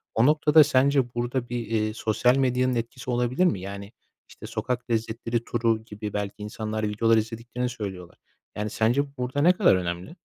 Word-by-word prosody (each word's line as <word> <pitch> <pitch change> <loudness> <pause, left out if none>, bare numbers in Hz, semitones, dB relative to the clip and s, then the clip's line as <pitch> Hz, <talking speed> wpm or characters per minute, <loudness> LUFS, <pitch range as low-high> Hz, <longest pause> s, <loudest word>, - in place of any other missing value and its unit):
O 115 - +4
noktada 150 +1 +6
sence 135 -3 +2
burada 120 +1 -2
bir, 120 -2 -3
eee, 110 -1 0
sosyal 115 +3 +2
medyanın 130 -1 +1
etkisi 120 +2 -5
olabilir 125 +7 +1
mi? 135 - +1
Yani, 100 +1 -7 0.4
işte, - - -11
sokak 125 0 -3
lezzetleri 115 +1 -1
turu 115 -2 0
gibi 105 -1 -7
belki 105 -1 -3
insanlar 110 +1 -4
videolar 115 +2 +3
izlediklerini 115 +3 -3
söylüyorlar. 95 -7 -7 0.4
Yani, 105 +1 -3
sence 140 +7 0
burada 125 +3 -2
ne 175 +4 +6
kadar 180 - +4
önemli? 90 - -4
115 Hz, 165 wpm, -25 LUFS, 110-125 Hz, 0.4 s, noktada